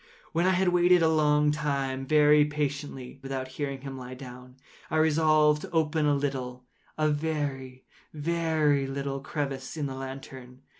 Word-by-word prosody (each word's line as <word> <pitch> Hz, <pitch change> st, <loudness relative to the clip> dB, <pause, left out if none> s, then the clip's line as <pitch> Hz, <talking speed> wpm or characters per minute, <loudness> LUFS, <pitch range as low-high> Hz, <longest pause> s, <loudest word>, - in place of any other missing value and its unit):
When 170 Hz, +2 st, +1 dB
I 190 Hz, -, +4 dB
had 185 Hz, 0 st, +2 dB
waited 175 Hz, 0 st, +4 dB
a -, -, +5 dB
long 150 Hz, -1 st, +3 dB
time, 140 Hz, -3 st, -2 dB
very 150 Hz, 0 st, +5 dB
patiently, 145 Hz, -3 st, -4 dB
without 135 Hz, -1 st, -4 dB
hearing 140 Hz, 0 st, -4 dB
him 135 Hz, -1 st, -7 dB
lie 125 Hz, 0 st, -8 dB
down, 125 Hz, -1 st, -11 dB, 0.3 s
I 160 Hz, -, 0 dB
resolved 155 Hz, -1 st, +3 dB
to -, -, -7 dB
open 155 Hz, -2 st, +1 dB
a 145 Hz, -, +3 dB
little—a 135 Hz, +2 st, -4 dB
very, 145 Hz, -4 st, -3 dB, 0.3 s
very 155 Hz, -3 st, +1 dB
little 135 Hz, 0 st, -3 dB
crevice 140 Hz, 0 st, -4 dB
in 150 Hz, -, -2 dB
the 135 Hz, -, -4 dB
lantern. 130 Hz, -1 st, -9 dB
145 Hz, 150 wpm, -28 LUFS, 135-155 Hz, 0.3 s, a